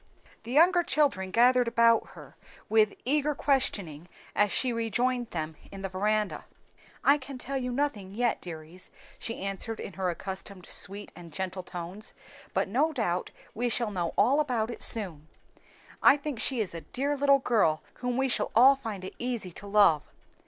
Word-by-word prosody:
The 230 - -8
younger 350 +6 +5
children 275 - +1
gathered 245 +4 +4
about 230 -1 +3
her, - - -13 0.3
with 215 -1 +3
eager 295 +2 +1
questioning 190 - -1 0.3
as 205 0 +3
she 250 +6 +1
rejoined 240 +2 0
them 155 -2 -4
in 195 0 -8
the 195 - -2
veranda. 210 +2 -1 0.6
"I 285 +2 +5
can 270 0 -8
tell 270 +2 -3
you 250 -1 -3
nothing 230 -8 -2
yet, 240 0 0
dears," 170 +1 -8 0.3
she 230 -4 -4
answered 195 +3 -4
in - - -6
her 190 -1 -1
accustomed 190 +1 -6
sweet 200 +4 -2
and 170 -2 -11
gentle 185 +3 -4
tones, 180 +4 -6 0.4
"but - - 0
no 275 +11 +1
doubt 185 - -1 0.2
we 240 +3 -1
shall 235 -2 +1
know 175 -4 -2
all 280 +4 +4
about 245 -6 0
it - - -8
soon. 175 -9 0 0.7
I 285 - +7
think 285 -4 -5
she 255 -1 0
is 200 - -3
a 165 - -6
dear 280 - -2
little 280 0 +4
girl 215 - +2
whom 250 0 -2
we 270 0 +2
shall 255 - 0
all 260 +4 +8
find 220 -8 -6
it 190 - -7
easy 240 -7 -3
to 200 +4 -9
love. 200 -7 +5
220 Hz, 175 wpm, -28 LUFS, 190-255 Hz, 0.7 s, all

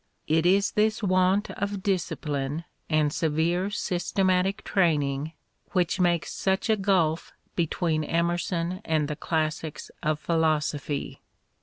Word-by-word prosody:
It 160 +2 +2
is 195 +2 +3
this 215 +1 +1
want 185 +1 +2
of 200 -1 -3
discipline 150 -6 -1 0.3
and 155 -2 +2
severe 165 +4 +1
systematic 190 0 0
training 150 -4 +1 0.4
which 180 0 +1
makes 175 -2 +1
such 190 +4 0
a - - +5
gulf 185 -6 +1 0.2
between 165 -1 0
Emerson 170 +2 -1
and 155 -2 +1
the 150 - -3
classics 155 0 -2
of 150 0 0
Philosophy. 155 -3 -1
170 Hz, 115 wpm, -26 LUFS, 155-190 Hz, 0.4 s, a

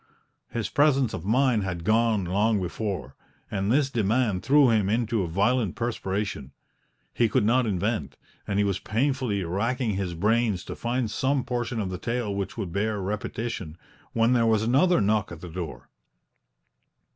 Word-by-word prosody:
His 115 -4 -2
presence 140 -4 +2
of 80 - -5
mind 125 +1 +3
had 90 -3 -4
gone 110 -1 +2
long 105 +4 +2
before, 90 - -4 0.4
and 100 +1 0
this 135 +1 +2
demand 110 -3 +1
threw 140 -2 +5
him 105 -3 +2
into 115 0 +1
a 90 - -1
violent 100 +4 +1
perspiration; 100 - -3 0.6
he 115 -2 +2
could 110 0 +2
not 120 +2 +3
invent, 105 +3 -2 0.3
and 100 - -1
he 105 - +3
was 100 -2 0
painfully 120 -3 0
racking 115 +7 -1
his 95 -3 -3
brains 105 +1 +1
to - - -6
find 120 -1 -2
some 135 +3 0
portion 120 -1 -2
of 95 -3 -2
the 90 - -5
tale 115 -2 -2
which 100 +1 -4
would 95 -7 -4
bear 105 +1 0
repetition 100 -3 -4 0.4
when 115 +2 +3
there 115 -2 +3
was 110 -1 +3
another 145 +10 +3
knock 105 -1 +1
at 85 - -8
the 90 - -8
door. 80 -7 -6
110 Hz, 165 wpm, -26 LUFS, 95-120 Hz, 0.6 s, threw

